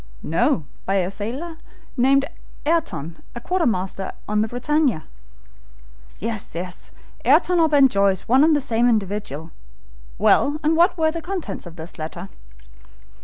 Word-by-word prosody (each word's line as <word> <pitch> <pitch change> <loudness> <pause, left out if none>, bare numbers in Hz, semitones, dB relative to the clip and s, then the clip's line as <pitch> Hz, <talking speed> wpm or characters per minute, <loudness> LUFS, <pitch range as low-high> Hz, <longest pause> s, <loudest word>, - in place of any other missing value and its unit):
"No, 175 - +1 0.2
by 195 - +1
a 185 -1 +1
sailor 260 +12 -5 0.4
called 275 +2 +4 0.4
Ayrton, 295 - -1
a - - -4
quartermaster 220 - -1
on 210 0 +1
the 220 - +1
BRITANNIA." 250 - 0 1.1
"Yes, 185 -5 -5 0.3
Ayrton 360 -1 +4
or 325 -1 +4
Ben 285 -3 +6
Joyce, 200 -5 +2
one 260 +4 +5
and 315 0 +5
the 290 - +1
same 240 -2 +2
individual. 195 - -2 0.7
Well, 290 - +3
and 310 +2 +3
what 345 +3 +4
were 315 -1 +2
the 330 0 -5
contents 325 - -5
of 165 - -11
this 165 +1 -10
letter?" 170 +4 -6
235 Hz, 135 wpm, -22 LUFS, 190-300 Hz, 1.1 s, Ben